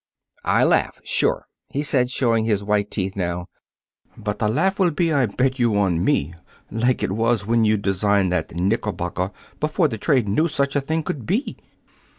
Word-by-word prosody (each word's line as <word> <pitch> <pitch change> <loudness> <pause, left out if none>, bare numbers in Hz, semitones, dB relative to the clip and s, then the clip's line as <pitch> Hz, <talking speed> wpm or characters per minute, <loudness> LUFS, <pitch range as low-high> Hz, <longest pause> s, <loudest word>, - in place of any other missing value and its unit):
"I - - +3
laugh - - +2
sure," - - +1 0.2
he 145 - -2
said, 130 -4 +2
showing 115 -4 +1
his 105 -3 0
white 105 0 0
teeth 95 -1 -3
now. 90 -2 -3 0.7
"But 105 -1 -4
the 105 - +1
laugh 190 - +1
will 185 -2 +4
be, 165 0 0
I 135 -4 +3
bet 130 +6 -1
you, 115 -4 +2
on 90 -4 +1
me 75 +4 +1 0.4
like 120 +3 0
it - - 0
was 115 0 +1
when 115 +1 +2
you 110 0 +3
designed 100 -1 +1
that 85 -2 -2
knickerbocker 95 -1 -1 0.3
before 155 +1 +1
the 110 -4 -5
trade 125 -2 +2
knew 155 +12 +2
such 140 -3 -1
a 145 - +2
thing 160 +3 -2
could 135 -6 -5
be." 220 - -1
110 Hz, 180 wpm, -22 LUFS, 100-140 Hz, 0.7 s, will